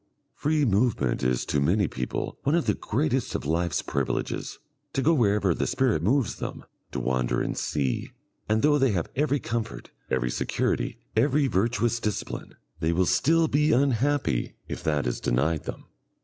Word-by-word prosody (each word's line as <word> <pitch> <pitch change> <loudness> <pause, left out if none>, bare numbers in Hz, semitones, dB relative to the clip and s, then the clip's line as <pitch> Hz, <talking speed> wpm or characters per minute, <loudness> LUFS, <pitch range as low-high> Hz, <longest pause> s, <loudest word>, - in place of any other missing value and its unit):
Free 150 0 +1
movement 100 - +1
is 65 -1 +1
to 75 - 0
many 95 +7 +3
people 65 -3 -4
one 145 +4 +2
of 170 - +1
the 105 - +3
greatest 130 +4 -1
of - - -3
life's 85 +2 0
privileges - - -2 0.4
to 135 - 0
go 165 - +4
wherever 105 - +3
the - - -1
spirit 125 -12 +1
moves 120 - +1
them, - - -6 0.3
to - - -3
wander 65 0 0
and - - -2
see 70 -4 -1 0.4
and 110 +1 +2
though 145 0 +4
they 130 -5 +3
have 85 -4 -2
every 145 0 +1
comfort, 115 -2 -4 0.2
every 60 -2 0
security, - - -1 0.2
every 140 +5 +3
virtuous 115 +1 +1
discipline, 105 -2 -4 0.2
they 80 0 +1
will 90 +2 +2
still 160 - +3
be 150 +1 +3
unhappy 135 - +1
if - - -5
that 75 -2 0
is - - -1
denied 75 +6 0
them. - - -6
110 Hz, 165 wpm, -26 LUFS, -, 0.4 s, go